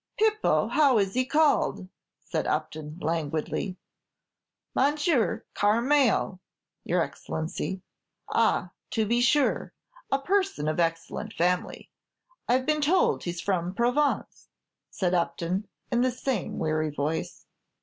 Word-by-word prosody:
"Pipo, 430 0 +2
how 280 -6 +4
is 195 -2 +1
he 255 0 +1
called?" 300 -11 +2 0.3
said - - -3
Upton, 155 0 -3
languidly. 160 +4 -2 1.0
"Monsieur 285 -5 +1
Carmael, 235 -2 +2 0.4
your - - +1
Excellency." 175 +4 -4 0.4
"Ah, - - +1 0.2
to 220 -2 0
be 235 +3 +2
sure; 280 +4 +2 0.4
a 275 - +4
person 375 - 0
of 155 +2 -1
excellent 165 +5 -2
family. 180 +1 -1 0.6
I've 255 +1 +2
been 305 +1 +1
told 345 +6 +2
he's 175 -1 -3
from 180 -2 -1
Provence," 250 +6 0 0.4
said 180 -2 -1
Upton, 180 +3 -1 0.2
in 240 0 +2
the 255 - +3
same 250 -4 -3
weary 155 0 0
voice. 150 +2 -3
215 Hz, 115 wpm, -27 LUFS, 170-275 Hz, 1.0 s, how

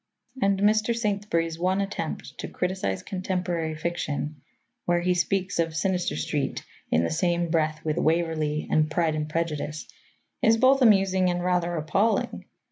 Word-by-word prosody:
And 195 -1 +2
Mr. 215 +3 +3
Saintsbury's 200 -7 -1
one 185 +2 +1
attempt 195 -5 -4
to - - -4
criticize 180 - -2
contemporary 180 -4 -2
fiction 155 -3 -3 0.4
where 175 0 +2
he 180 +1 +2
speaks 185 +1 0
of 165 -1 0
Sinister 180 - 0
Street 75 - -2 0.2
in 80 - +3
the - - -1
same 170 0 0
breath 155 -2 0
with 155 0 0
Waverley 160 -2 0
and 155 0 +3
Pride 160 0 +1
and 155 0 -3
Prejudice 155 -2 -3 0.5
is 225 +1 +5
both 265 +3 +4
amusing 195 -5 +4
and 175 0 -1
rather 175 -1 +1
appalling. 180 +8 0
175 Hz, 145 wpm, -26 LUFS, 155-190 Hz, 0.5 s, is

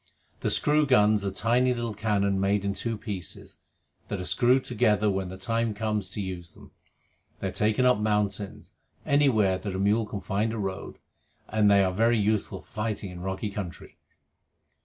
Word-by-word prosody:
The - - -1
screw 150 0 +2
guns 105 -5 +4
are 100 - 0
tiny 120 +6 +1
little 120 -2 -3
cannon 100 -2 0
made 100 +1 +1
in 100 - 0
two 115 +2 -3
pieces, 100 -6 -7 0.5
that 100 - -3
are 90 - -5
screwed 125 +5 +3
together 105 -3 +2
when 95 -1 -2
the 95 - -8
time 115 +2 -1
comes 105 -2 -1
to 100 - -5
use 90 -4 -6
them. - - -16 0.7
They 95 - -2
are - - -6
taken 110 +6 +1
up 125 -4 +4
mountains, 105 -2 -2 0.3
anywhere 110 -10 +3
that 100 -2 -5
a - - -1
mule 105 +3 +2
can 105 - -5
find 100 +4 -1
a - - -4
road, 95 -2 -4 0.5
and 110 -1 +3
they 100 -1 +5
are 95 - +1
very 115 +4 +3
useful 105 -2 0
for - - -23
fighting 105 -3 -3
in 90 - -9
rocky 95 +3 -3
country. 95 -5 -7
105 Hz, 180 wpm, -27 LUFS, 95-115 Hz, 0.7 s, they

